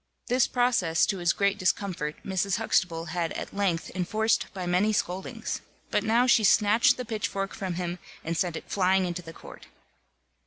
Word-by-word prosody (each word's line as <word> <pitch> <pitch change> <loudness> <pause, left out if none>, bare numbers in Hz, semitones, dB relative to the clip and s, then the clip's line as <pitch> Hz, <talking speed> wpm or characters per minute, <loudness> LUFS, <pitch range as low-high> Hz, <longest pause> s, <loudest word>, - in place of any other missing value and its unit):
This 250 +1 +3
process, 230 -10 +2
to 195 - -2
his 175 -1 +3
great 200 +2 0
discomfort, 185 -5 -1
Mrs. 190 0 0
Huxtable 170 -7 0
had 170 -2 -1
at - - -6
length 190 -5 -1
enforced 215 +5 0
by 185 -3 -5
many 180 +5 +2
scoldings; 190 -2 -3 0.3
but - - +1
now 235 +3 +3
she 235 -3 +4
snatched 210 +2 +4
the 250 - -4
pitchfork 205 -3 -3
from 185 -3 -4
him, 175 0 -3 0.2
and 165 +1 -2
sent 175 0 -1
it - - -7
flying 190 -1 +2
into 175 0 -3
the 165 -1 -10
court. - - -13
190 Hz, 170 wpm, -27 LUFS, 175-210 Hz, 0.3 s, she